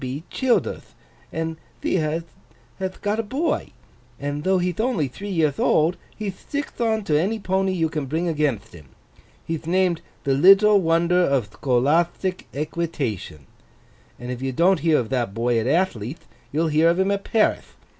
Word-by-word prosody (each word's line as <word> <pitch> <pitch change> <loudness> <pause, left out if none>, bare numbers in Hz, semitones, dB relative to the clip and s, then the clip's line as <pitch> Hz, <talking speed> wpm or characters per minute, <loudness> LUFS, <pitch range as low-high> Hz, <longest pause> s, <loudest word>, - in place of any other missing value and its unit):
W. 130 +2 -4
B. - - -26
Childerth, 260 -2 0 0.4
and 160 0 -3 0.2
thee - - +1
hath 160 +1 -1 0.8
got 210 +2 0
a - - +3
boy, 265 +10 -1 0.5
and 145 +1 -3
though 190 +2 +3
he'th 180 0 -1
only 220 - +1
three 200 +11 -8
yearth 155 -6 +1
old, 160 +3 +3 0.2
he 210 -2 -3
thtickth 285 +7 -6
on 220 -2 +1
to 155 -6 0
any 200 +7 0
pony 190 -1 0
you 170 -3 +1
can 155 -3 -4
bring 160 +6 -1
againtht 145 - -1
him. 80 -5 -13 0.6
He'th 165 -1 -4
named 180 -1 +2 0.2
The 135 - +1
Little 195 +7 +6
Wonder 170 +1 +3
of 135 - +1
Thcolathtic 160 - +1
Equitation; 135 - -4 0.7
and 125 +1 -6
if 125 0 -5
you 135 0 -1
don't 175 +7 +3
hear 160 0 +3
of 115 - -2
that 120 -6 -1
boy 120 0 +1
at 115 - -2
Athley'th, 145 - -1 0.3
you'll 160 +3 +1
hear 155 +2 +4
of 170 - +2
him 190 +1 +2
at 200 0 -1
Parith. 220 -2 0
165 Hz, 170 wpm, -23 LUFS, 135-190 Hz, 0.8 s, Little